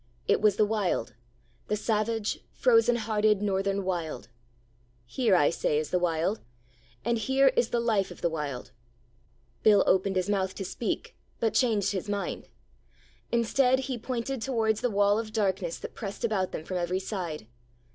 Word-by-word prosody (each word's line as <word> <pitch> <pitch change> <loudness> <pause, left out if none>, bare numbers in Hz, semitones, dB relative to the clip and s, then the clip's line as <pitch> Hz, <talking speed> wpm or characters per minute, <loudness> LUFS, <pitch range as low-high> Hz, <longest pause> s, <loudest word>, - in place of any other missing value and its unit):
It - - +3
was 210 -2 +4
the 210 - +3
Wild 205 - -1 0.5
the 210 - 0
savage, 215 0 -1
frozen 455 - +4
hearted 215 -2 +1
Northern 195 0 0
Wild!' 165 - -3 0.8
Here, 220 - +2
I 145 -4 +4
say, 150 - 0
is 155 0 -2
the 180 - +2
Wild. 175 +4 0 0.6
And 235 -1 +1
here 265 +4 +4
is 235 - +1
the 240 - 0
life 220 -5 +1
of - - -11
the - - +2
Wild: 140 -5 -4 0.9
'Bill 210 -2 +6
opened 190 +1 +2
his 185 0 0
mouth 190 -2 0
to 195 - -5
speak, - - -4 0.2
but 225 -2 +1
changed 215 -4 +2
his 195 0 -4
mind. 205 -1 -3 0.8
Instead, 250 +3 +3
he 265 -1 -3
pointed 250 +2 -3
towards 225 -4 0
the 245 - +1
wall 205 0 +3
of 220 -1 -5
darkness 190 -5 0
that - - -8
pressed 205 +2 -4
about 195 -5 0
them 155 - -6
from 185 - -3
every 175 +1 -1
side. 180 - -5
205 Hz, 165 wpm, -28 LUFS, 185-225 Hz, 0.9 s, Bill